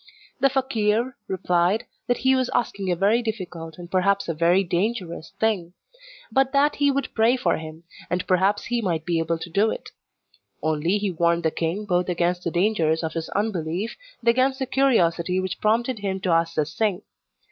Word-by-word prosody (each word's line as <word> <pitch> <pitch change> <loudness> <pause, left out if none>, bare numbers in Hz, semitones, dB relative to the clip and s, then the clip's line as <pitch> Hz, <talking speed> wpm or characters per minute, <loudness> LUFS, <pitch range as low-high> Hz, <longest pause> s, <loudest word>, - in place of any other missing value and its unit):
The 275 +1 +4
fakeer 245 -2 0
replied 180 +2 +1 0.2
that 245 - +2
he 260 - +6
was 255 -1 +1
asking 200 -6 -1
a - - +2
very 205 +7 +3
difficult, 175 -8 -5
and 175 -1 -10
perhaps 200 +1 +2
a 165 - -1
very 170 +4 +3
dangerous, 180 -1 -2
thing; 195 -6 0 0.6
but 270 -1 +2
that 285 +1 +3
he 285 0 +3
would 275 -1 -1
pray 230 +3 +3
for 255 - +1
him, 160 +1 -9 0.3
and 180 +1 -1
perhaps 190 +3 +2
he 240 0 -1
might 165 -6 -1
be 170 -2 +1
able 165 +1 0
to 165 - -8
do 205 +5 +3
it; - - -6 0.7
only 160 +5 +1
he 205 -2 -1
warned 170 0 +1
the 160 - +2
king 170 +7 -2
both 180 -2 0
against 175 0 0
the - - 0
dangers 170 -3 +1
of 160 - -3
his 165 -1 -4
unbelief, 195 0 -2 0.3
and 235 - +2
against 260 +3 +3
the 265 - -2
curiosity 185 -10 +2
which 185 +1 -4
prompted 230 +2 +1
him 195 -1 -2
to 185 - 0
ask 165 0 +2
this 155 +1 -1
thing. 210 -5 0
190 Hz, 190 wpm, -24 LUFS, 170-225 Hz, 0.7 s, he